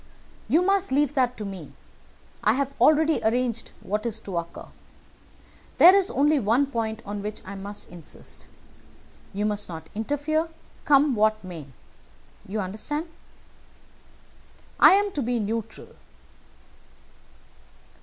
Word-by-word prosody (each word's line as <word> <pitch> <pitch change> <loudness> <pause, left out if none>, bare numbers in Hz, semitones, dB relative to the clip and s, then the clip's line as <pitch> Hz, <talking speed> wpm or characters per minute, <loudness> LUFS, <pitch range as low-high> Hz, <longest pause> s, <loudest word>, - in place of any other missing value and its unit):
"You 335 +3 +3
must 390 -2 +1
leave 290 +1 +2
that 250 -3 +1
to 210 - -5
me. 185 -7 -8 0.7
I 215 - +4
have 275 +2 -1
already 310 +1 +4
arranged 235 0 0
what 210 +2 -2
is 230 -2 -3
to 195 -4 -7
occur. 170 0 -8 1.1
There 360 +2 +9
is 390 -1 +4
only 295 +2 +3
one 235 +5 +2
point 230 -4 -3
on 205 0 -5
which 210 +1 -5
I 195 - -7
must 200 +1 -8
insist. 170 -3 -11 0.8
You 205 +1 -2
must 210 -2 -2
not 160 -2 -8
interfere, 290 +8 -1 0.4
come 285 -1 +5
what 215 -1 +2
may. 170 -6 -8 0.8
You 210 +2 -2
understand?" 295 - -4 1.7
"I - - +9
am 405 +1 +2
to 295 - -2
be 245 -1 -1
neutral?" 225 +1 -4
230 Hz, 125 wpm, -25 LUFS, 205-290 Hz, 1.7 s, There